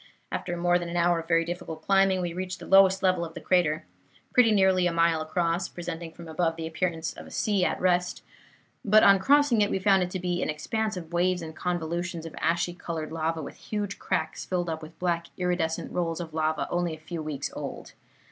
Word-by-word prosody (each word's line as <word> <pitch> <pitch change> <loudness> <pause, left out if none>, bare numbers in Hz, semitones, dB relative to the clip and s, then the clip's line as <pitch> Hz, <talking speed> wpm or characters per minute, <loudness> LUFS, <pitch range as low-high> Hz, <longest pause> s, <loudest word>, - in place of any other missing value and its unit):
After 175 -1 -3
more 175 +1 +3
than 175 -1 -5
an 175 - -3
hour 170 0 +3
of 165 - -8
very 165 0 +3
difficult 170 -2 -6
climbing, 195 0 +3
we 175 -1 -3
reached 185 +1 -4
the - - -10
lowest 190 0 +5
level 185 -2 +3
of 165 -1 -7
the - - -5
crater, 165 -4 +1 0.5
pretty 245 -3 +6
nearly 190 -3 +4
a - - 0
mile 165 -1 +2
across, 170 +2 0
presenting 170 -1 -6
from 170 +1 -11
above 165 +1 0
the 165 -1 -5
appearance 165 0 -2
of - - -11
a - - -11
sea 205 -4 0
at - - 0
rest; 180 -1 +1 0.6
but 215 +1 +5
on 195 -1 +7
crossing 280 0 +4
it, 205 - +3
we - - 0
found 195 0 +4
it 180 - 0
to 185 - -4
be 180 0 -1
an - - -1
expanse 215 +7 -2
of 170 -1 -8
waves 180 0 +1
and 160 -1 -8
convolutions 175 -1 -3
of 165 - -8
ashy 170 +2 +1
colored 165 -3 -5
lava, 160 0 -2
with - - -9
huge 205 -2 -4
cracks - - -2
filled 175 -2 -2
up 160 0 -4
with 155 +1 -11
black 170 -2 -1
iridescent 175 -3 -1
rolls 165 -2 -1
of 165 -2 -6
lava 155 0 0
only 175 -2 0
a - - -16
few 165 +1 -6
weeks 155 -3 -4
old. - - -7
175 Hz, 220 wpm, -27 LUFS, 165-185 Hz, 0.6 s, on